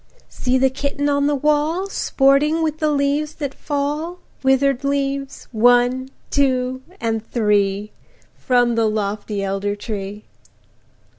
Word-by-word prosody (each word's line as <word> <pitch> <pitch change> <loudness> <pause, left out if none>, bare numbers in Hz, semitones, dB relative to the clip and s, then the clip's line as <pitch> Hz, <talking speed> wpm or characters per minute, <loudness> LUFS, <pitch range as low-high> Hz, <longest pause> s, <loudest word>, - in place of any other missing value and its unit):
See 255 0 0
the 265 0 +3
Kitten 280 +2 -2
on 285 0 +2
the 295 - +2
wall, 300 +6 +1
Sporting 300 -2 +2
with 310 -1 -1
the 310 - +2
leaves 290 +1 0
that 285 -3 -4
fall, 300 +4 -3 0.2
Withered 265 0 +2
leaves–one–two–and 260 -2 +1 1.2
three– 210 -2 +1 0.4
From 245 -2 +2
the 225 -1 +2
lofty 205 -1 -2
elder 195 +1 -1
tree! 205 -1 -6
270 Hz, 105 wpm, -20 LUFS, 220-290 Hz, 1.2 s, the